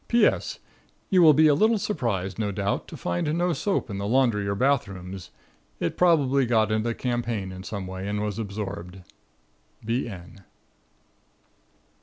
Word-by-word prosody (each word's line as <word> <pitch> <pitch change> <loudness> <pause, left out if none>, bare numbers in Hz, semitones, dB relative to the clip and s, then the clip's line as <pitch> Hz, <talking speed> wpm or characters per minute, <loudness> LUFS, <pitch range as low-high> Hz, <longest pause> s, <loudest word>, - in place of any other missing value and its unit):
P.S. 240 0 +2 0.5
You 185 -2 +5
will 155 -3 +7
be 155 +2 +5
a 150 - +5
little 220 +9 +3
surprised, 115 - -2
no 105 -2 0
doubt, 100 +1 -2
to - - -9
find 90 - -1
no 175 0 +1
soap 195 -2 -1
in 100 -4 -5
the 100 - -2
laundry 115 -4 +2
or 100 - 0
bath 135 0 +2
rooms. 95 -1 -8 0.5
It 85 - -2
probably 140 -7 +3
got 110 -2 +2
into 110 +2 0
the 115 - -2
campaign 120 -6 -2
in 95 0 -8
some 100 -1 -5
way 95 +1 -6
and 105 0 -2
was 105 0 -3
absorbed. 95 -4 -6 0.8
B.N. 105 -5 -4
110 Hz, 160 wpm, -25 LUFS, 95-135 Hz, 0.8 s, will